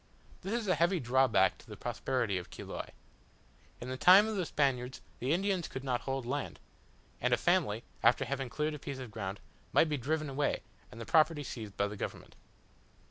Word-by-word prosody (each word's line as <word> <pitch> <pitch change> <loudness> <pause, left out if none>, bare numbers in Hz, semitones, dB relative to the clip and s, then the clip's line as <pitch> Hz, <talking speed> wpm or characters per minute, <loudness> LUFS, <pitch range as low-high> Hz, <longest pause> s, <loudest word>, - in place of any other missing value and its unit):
This 195 - -4
is 235 -3 -1
a 185 - +4
heavy 170 +3 +2
drawback 130 +1 +3
to - - -17
the - - -9
prosperity 120 -8 -1
of 90 - -10
Chiloe. - - -7 0.9
In 120 - -7
the 130 - -3
time 190 +8 +8
of 220 - -2
the 185 -4 -1
Spaniards 130 -3 0 0.2
the 130 +3 -1
Indians 185 0 +1
could 130 - -6
not 125 -3 -1
hold 135 -2 -3
land; 140 +3 -3 0.6
and - - +3
a - - -8
family, 105 +2 +1 0.2
after 120 +3 +4
having 135 0 -3
cleared 150 +4 -1
a 150 - -6
piece 140 -1 -6
of 130 -4 -7
ground, 100 -2 -5 0.3
might 160 - +5
be 150 - 0
driven 155 +4 -1
away, 140 +1 -1 0.3
and 115 - -10
the 115 - -6
property 155 +1 +3
seized 110 -6 -7
by 100 - +2
the 105 +1 -5
government. - - -6
135 Hz, 195 wpm, -32 LUFS, 120-155 Hz, 0.9 s, time